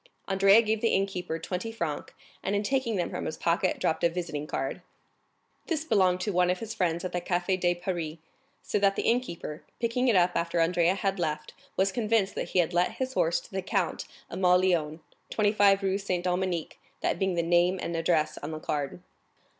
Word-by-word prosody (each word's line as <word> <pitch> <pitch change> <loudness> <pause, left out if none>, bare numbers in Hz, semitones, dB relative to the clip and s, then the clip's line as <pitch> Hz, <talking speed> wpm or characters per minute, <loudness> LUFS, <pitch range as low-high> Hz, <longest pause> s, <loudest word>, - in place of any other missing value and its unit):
Andrea 195 +3 +5
gave 220 0 0
the 230 - +2
innkeeper 190 -4 -1
twenty 185 +6 -4
francs, 170 -10 -4 0.3
and 200 - -1
in 205 - 0
taking 255 -1 0
them 180 - -1
from - - -4
his 155 - -4
pocket 175 +2 +1
dropped 160 - 0
a 170 - +5
visiting 165 -4 -4
card. - - -3 0.9
This 315 -3 -1
belonged 185 - +3
to 205 - -1
one 180 0 +3
of 180 - +1
his 225 +1 -6
friends 175 -4 -1
at 185 - -3
the 175 - -2
Café 180 +2 0
de 175 -1 +2
Paris, 175 -3 -3 0.5
so - - 0
that 200 -1 +3
the - - -1
innkeeper, 200 -10 -1 0.2
picking 240 +2 0
it 235 - +4
up 180 -1 +4
after 170 0 0
Andrea 170 +2 +3
had 195 -1 -1
left, 155 -3 -2 0.2
was 190 +1 +3
convinced 215 -3 +1
that - - -4
he - - -2
had 175 -1 +2
let 175 +1 +2
his 260 0 -3
horse 165 -7 +2
to - - -17
the 190 0 -2
Count 185 -3 -1 0.2
of 175 - -5
Mauléon, 180 -4 +2 0.3
25 205 -2 +3
Rue 195 0 +1
Saint 185 -3 -2
Dominique, 180 -2 -1 0.2
that - - 0
being 190 -2 +1
the 170 - +1
name 175 +2 +3
and 170 - -3
address 165 -1 +1
on 145 - -6
the 155 -1 -5
card. 150 +3 -3
180 Hz, 200 wpm, -28 LUFS, 170-200 Hz, 0.9 s, Andrea